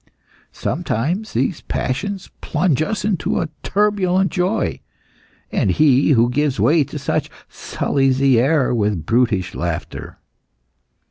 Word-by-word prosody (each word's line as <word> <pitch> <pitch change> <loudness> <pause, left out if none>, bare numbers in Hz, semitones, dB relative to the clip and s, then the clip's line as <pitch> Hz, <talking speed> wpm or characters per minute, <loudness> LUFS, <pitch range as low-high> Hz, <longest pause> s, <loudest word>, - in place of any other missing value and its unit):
Sometimes 170 - -2
these 170 - -1
passions 195 +9 -3
plunge 155 -2 0
us 205 +6 -2
into 200 -6 0
a 165 - -2
turbulent 195 -2 +1
joy, 190 +4 -1 0.7
and - - +1
he 140 - +4
who 115 -1 +4
gives 145 0 0
way 155 0 +4
to - - -7
such, - - -2 0.2
sullies 135 -2 -1
the 135 -3 +4
air 135 0 +2
with 105 -8 0
brutish 110 -5 +1
laughter. 85 -2 -5
145 Hz, 120 wpm, -19 LUFS, 125-185 Hz, 0.7 s, he